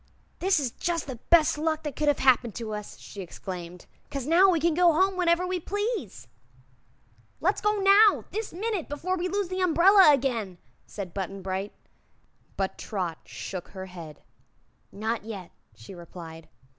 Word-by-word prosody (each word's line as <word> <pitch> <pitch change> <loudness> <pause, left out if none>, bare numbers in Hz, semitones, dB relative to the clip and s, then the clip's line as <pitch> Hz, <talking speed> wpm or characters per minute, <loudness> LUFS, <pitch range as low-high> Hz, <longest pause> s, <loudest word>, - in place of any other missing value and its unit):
"This 375 -2 +2
is 260 -5 -2
jus' 340 -2 -1
the 260 -4 -7
best 315 -3 +5
luck 315 0 -1
that 295 -3 -5
could 300 - -1
have 290 - +4
happened 245 -4 +3
to 225 -2 -5
us," 210 -1 -7
she 200 - -9
exclaimed, 180 -1 -8 0.2
"'cause 275 -3 -4
now 350 +6 +5
we 345 -3 +3
can 335 +1 +2
go 350 +1 +5
home 375 +4 +2
whenever 350 0 +2
we 365 0 -2
please." 395 - -4 1.1
"Let's 380 +5 +1
go 420 -1 +1
now 400 +2 +5
this 440 0 -4
minute 405 -1 -3
before 335 +6 -2
we 365 0 -2
lose 395 0 -2
the 370 0 -2
umbrella 365 0 +6
again," 235 -9 0 0.3
said 190 -5 -7
Button 195 0 -5
Bright. 190 +2 -3 0.8
But 195 -1 -2
Trot 180 -6 -4
shook 185 -3 -7
her 190 -1 -8
head. 170 -5 -11 0.7
"Not 220 +2 -3
yet," 200 -5 -8 0.2
she 115 +11 -12
replied. 165 -2 -11
290 Hz, 165 wpm, -27 LUFS, -, 1.1 s, umbrella